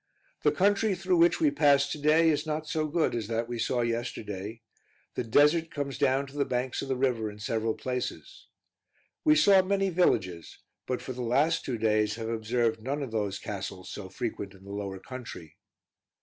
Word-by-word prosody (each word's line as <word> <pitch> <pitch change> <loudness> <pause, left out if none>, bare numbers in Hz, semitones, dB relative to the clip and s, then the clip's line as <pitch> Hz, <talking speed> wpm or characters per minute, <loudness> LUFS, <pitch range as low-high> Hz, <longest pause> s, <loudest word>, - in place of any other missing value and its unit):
The - - +4
country 200 +1 +2
through 185 -1 +1
which 170 +1 +4
we 150 -3 +3
passed 145 -1 +4
to 150 - -4
day 155 +3 +4
is 150 0 0
not 155 0 -2
so 155 0 -1
good 160 +1 +1
as 115 -4 -2
that 115 +1 -1
we 120 -1 -4
saw 120 +1 0
yesterday; 115 -2 -4 0.5
the - - -2
desert 150 +8 +4
comes 140 -4 -4
down 140 -1 +2
to 135 - -14
the - - +4
banks 125 -1 -2
of - - -5
the 135 - 0
river 125 -4 0
in 105 - -10
several 110 +1 -1
places. 125 - -5 0.8
We 150 - +5
saw 190 +5 +6
many 195 0 0
villages, 95 - 0 0.3
but 125 -1 -2
for 130 - -5
the 125 - -6
last 140 +8 +2
two 125 -3 -3
days 105 -1 +1
have 115 0 -5
observed 115 0 0
none 140 +5 -2
of 130 - -6
those 105 -3 -1
castles 95 -2 -6
so 95 -2 -7
frequent 100 -1 -5
in 95 - -17
the 100 - -10
lower 100 -1 -4
country. 110 - -9
125 Hz, 190 wpm, -28 LUFS, 110-150 Hz, 0.8 s, saw